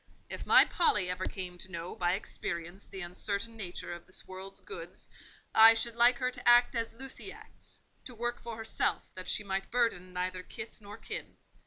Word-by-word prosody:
If - - -6
my - - +8
Polly 205 - +2
ever 185 +1 -2
came 180 -2 -5
to 190 - -6
know 170 0 -5
by 175 0 +1
experience 175 -1 -4
the 190 -1 -7
uncertain 200 +5 -3
nature 180 -4 -5
of 175 0 -10
this 185 - -8
world's 190 +1 -8
goods, 430 - -9 0.5
I 225 +1 +9
should 235 0 0
like 240 +1 +6
her 255 0 0
to 250 - +1
act 240 +1 +7
as 230 -1 -2
Lucy 265 +2 -6
acts: - - -13 0.3
to 250 - -9
work 240 +1 -2
for 235 -1 -6
herself, 225 0 0
that 185 0 -6
she 210 - 0
might 195 -1 -2
burden 230 -7 +1
neither 185 0 -2
kith 220 +4 -8
nor 205 0 -10
kin." - - -7
200 Hz, 190 wpm, -31 LUFS, 185-235 Hz, 0.5 s, I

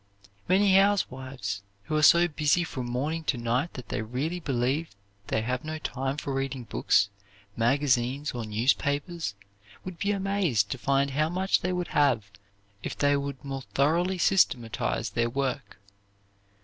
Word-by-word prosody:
Many 195 +1 +4
housewives 130 - 0 0.2
who 155 - -3
are 155 - +2
so 170 +3 +7
busy 155 +1 +2
from 130 -7 -5
morning 145 +7 -2
to 130 - +1
night 120 +7 -1
that 125 - -9
they - - -2
really 135 +10 -3
believe 140 +2 -1 0.4
they 110 - 0
have 125 +2 -2
no 155 0 -4
time 135 -2 -3
for 140 -2 -3
reading 135 -1 -2
books, 100 -3 +2 0.5
magazines, 130 +2 +1
or 120 -2 -4
newspapers 140 - 0 0.5
would 180 -3 -7
be 200 - 0
amazed 190 - +1
to 130 - -3
find 140 +1 +1
how 155 +3 +1
much 185 +3 +1
they 180 - -1
would 180 -1 -2
have 120 -9 +2 0.5
if - - -5
they 145 0 +3
would 140 -1 -4
more 135 -1 -4
thoroughly 170 +8 +1
systematize 120 - +1
their 115 +3 0
work. 135 -4 -3
140 Hz, 150 wpm, -27 LUFS, 125-165 Hz, 0.5 s, so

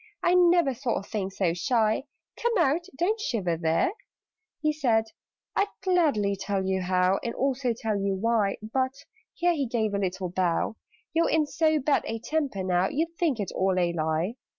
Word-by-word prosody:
I 350 - +4
never 345 -5 +4
saw 245 -1 -2
a - - -3
thing 195 -1 -3
so 185 -3 0
shy. 220 +7 +1 0.3
Come 475 -1 0
out! 340 +1 +2
Don't 415 +8 +1
shiver 195 - -1
there!" 165 - +1 0.7
He 305 -1 +1
said 235 -7 +2 0.5
"I'd 400 - +2 0.2
gladly 295 - +2
tell 195 0 -2
you 190 0 0
how, 185 +1 +2
And 235 - -3
also 265 -1 0
tell 220 -5 -1
you 195 0 0
why; 210 0 +1
But" 260 +4 -1 0.4
(here 350 0 +2
he 285 -5 -1
gave 220 -3 -1
a 200 - 0
little 190 -1 -2
bow) 180 +3 0 0.4
"You're 330 +1 +2
in 315 -1 +3
so 315 +1 +2
bad 290 0 +2
a 225 - -2
temper 260 -4 -2
now, 185 0 +1
You'd 330 +3 -2
think 310 -10 +1
it 200 - -3
all 190 0 +1
a 175 -1 +1
lie. 160 +7 -1
225 Hz, 180 wpm, -27 LUFS, 190-305 Hz, 0.7 s, I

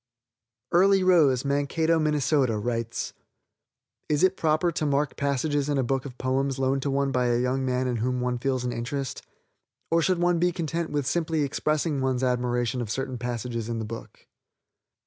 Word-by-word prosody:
Early 195 +2 +5
Rose, 150 -8 +4
Mankato, 145 +4 +1
Minn., 155 -1 +1 0.4
writes: 115 -1 -3 1.0
"Is 150 +1 +2
it 185 0 +4
proper 160 +1 +1
to 155 - -2
mark 140 0 0
passages 140 +1 0
in 145 - +1
a 135 - +2
book 135 +2 -1
of 125 -3 -8
poems 135 +1 0
loaned 135 +1 +1
to 140 - -1
one 140 0 +1
by 125 -1 +1
a 120 0 +2
young 125 +2 0
man 130 0 0
in 125 -1 -1
whom 125 +3 -1
one 125 0 -1
feels 130 -1 -1
an 125 - -1
interest, 130 +3 -4 0.7
or 165 0 +4
should 185 +2 +2
one 175 0 +2
be 175 +1 +3
content 170 -1 -3
with 145 -2 -1
simply 160 +1 0
expressing 150 +1 0
one's 130 -1 0
admiration 125 0 0
of 115 - -4
certain 130 +1 -3
passages 120 -1 -3
in 115 - -2
the 110 - -3
book?" 115 +1 -9
135 Hz, 180 wpm, -26 LUFS, 125-155 Hz, 1.0 s, Early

